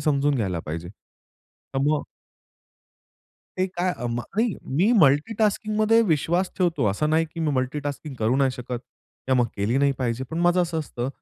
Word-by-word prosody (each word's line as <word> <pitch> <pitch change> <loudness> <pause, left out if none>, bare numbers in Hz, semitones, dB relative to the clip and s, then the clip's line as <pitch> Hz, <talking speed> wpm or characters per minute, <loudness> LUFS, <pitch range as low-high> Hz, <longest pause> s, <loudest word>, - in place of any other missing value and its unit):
समजून 145 -1 +2
घ्यायला 95 -9 -1
पाहिजे." 85 +3 -4 0.9
तर - - +1
मग 150 -1 +1 1.6
ते 185 - +2
काय 180 -1 -1
अ, 120 - -4
म 120 +1 -2
नाही 220 - -1 0.2
मी 200 +6 +4
मल्टीटास्किंगमध्ये 215 +8 +3
विश्वास 175 +5 +1
ठेवतो 165 - +1
असं 150 +10 -1
नाही 160 +1 +3
की 165 - -4
मी 155 -2 +1
मल्टीटास्किंग 145 +2 -3
करू 115 +4 +2
नाही 135 -1 +3
शकत 125 -1 -5 0.5
किंवा 130 - +2
मग - - +1
केली 105 +5 0
नाही 140 0 +3
पाहिजे. 125 0 -1
पण 160 +6 -5
माझं 175 +1 +4
असं 165 -2 -2
असतं 125 -5 -4
145 Hz, 165 wpm, -24 LUFS, 125-175 Hz, 1.6 s, मी